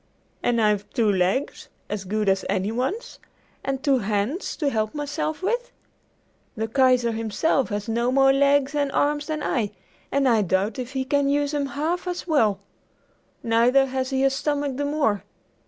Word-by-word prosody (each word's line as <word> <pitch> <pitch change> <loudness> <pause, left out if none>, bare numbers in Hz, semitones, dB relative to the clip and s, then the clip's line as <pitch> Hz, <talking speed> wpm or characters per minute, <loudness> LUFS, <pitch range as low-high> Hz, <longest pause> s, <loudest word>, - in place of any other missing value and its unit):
And 240 -1 +1
I've 210 -2 +1
two 220 -3 +2
legs 190 +8 -1 0.2
as 205 -2 -4
good 210 +2 -1
as 195 0 +2
any 195 +1 0
one's, 260 - -3 0.4
and 270 0 -3
two 275 -3 +3
hands 210 - -2
to 290 -4 0
help 215 0 -1
myself 295 +3 -3
with! 480 +5 -1 0.9
The 220 +1 -1
Kaiser 250 -1 +3
himself 225 +5 0
has 205 0 -3
no 235 +2 0
more 270 0 +5
legs 280 0 +3
and 285 -2 0
arms 295 0 +1
than 310 -1 -3
I, 225 -6 0 0.4
and 275 -1 +2
I 230 -3 +4
doubt 195 +4 0
if 250 +1 -5
he 265 -1 -1
can 280 +1 +1
use 285 0 +1
them 290 -2 -1
half 325 +6 -2
as 355 0 -3
well. 230 - +2 0.8
Neither 240 +4 +4
has 260 0 -2
he 265 -1 0
a 270 - +4
stomach 285 -1 -1
the 285 - -1
more! 280 - 0
265 Hz, 170 wpm, -24 LUFS, 220-285 Hz, 0.9 s, more